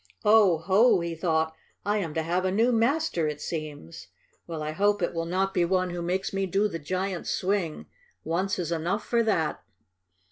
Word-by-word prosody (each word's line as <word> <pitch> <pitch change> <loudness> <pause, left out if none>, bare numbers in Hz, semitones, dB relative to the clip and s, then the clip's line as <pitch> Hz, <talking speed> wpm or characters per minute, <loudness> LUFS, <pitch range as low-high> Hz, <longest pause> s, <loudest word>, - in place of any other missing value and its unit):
"Oh, 210 -5 +6
ho!" 190 +7 +4
he 170 0 -3
thought. 160 -1 0 0.3
"I 205 +1 +1
am 165 -6 -4
to 160 - 0
have 175 +3 0
a 185 - +1
new 225 +6 +3
master, 235 - +1
it 150 -1 -4
seems. 145 - -6 0.4
Well, 160 -2 -4
I 155 - -3
hope 205 +3 +1
it - - 0
will 165 0 -2
not 190 +2 0
be 175 - +2
one 185 +1 +1
who 175 0 -4
makes 185 +3 -2
me 195 0 0
do 195 +3 +2
the 165 -5 -5
giant's 185 +3 -3
swing. 185 -4 -1 0.4
Once 185 +5 -1
is 170 -3 -3
enough 175 +6 -1
for 235 -1 +2
that!" 195 -9 0
180 Hz, 190 wpm, -27 LUFS, 165-200 Hz, 0.4 s, Oh